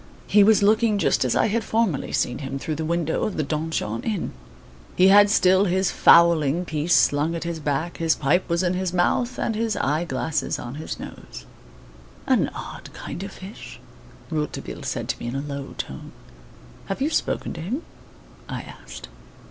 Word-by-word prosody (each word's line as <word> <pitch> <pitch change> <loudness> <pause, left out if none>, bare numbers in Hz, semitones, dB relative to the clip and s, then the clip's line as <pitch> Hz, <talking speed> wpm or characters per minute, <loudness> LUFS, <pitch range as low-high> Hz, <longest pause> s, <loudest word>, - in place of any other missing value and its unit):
He 205 0 +5
was 210 0 +5
looking 215 +1 +3
just - - +2
as - - 0
I - - +3
had 225 +2 0
formerly 220 -11 0
seen 125 - 0
him 135 -1 -4
through 155 +3 -3
the 155 +1 -3
window 165 -1 -1
of 210 - -2
the 155 - +1
Donjon 150 -7 -2
Inn. 210 -6 -2 0.6
He 185 +1 +6
had 205 +1 +7
still 190 -2 +4
his 190 0 +1
fowling 170 -1 +5
piece 155 +2 +1
slung 150 +4 +3
at 165 - -4
his 170 -1 -4
back, 150 +3 -2
his 165 -1 +2
pipe 175 +7 +1
was 170 +2 +1
in 180 0 +1
his 185 -1 -2
mouth, 235 +8 +1
and 225 - -1
his 220 0 -1
eye 150 +5 0
glasses 150 +1 -2
on 120 - -7
his - - -6
nose. - - -10 0.8
"An - - +2
odd - - -8
kind - - -7
of 195 0 -6
fish!" 195 +3 -10 0.5
Rouletabille 150 -2 -4
said - - -3
to - - -2
me, - - -5
in 120 - -4
a 135 - -1
low 140 -1 -6
tone. 65 - -7 0.7
"Have 195 - -3
you 290 +4 0
spoken - - -1
to - - -7
him?" 240 - -3 0.7
I - - -4
asked. - - -11
170 Hz, 185 wpm, -24 LUFS, 150-200 Hz, 0.8 s, had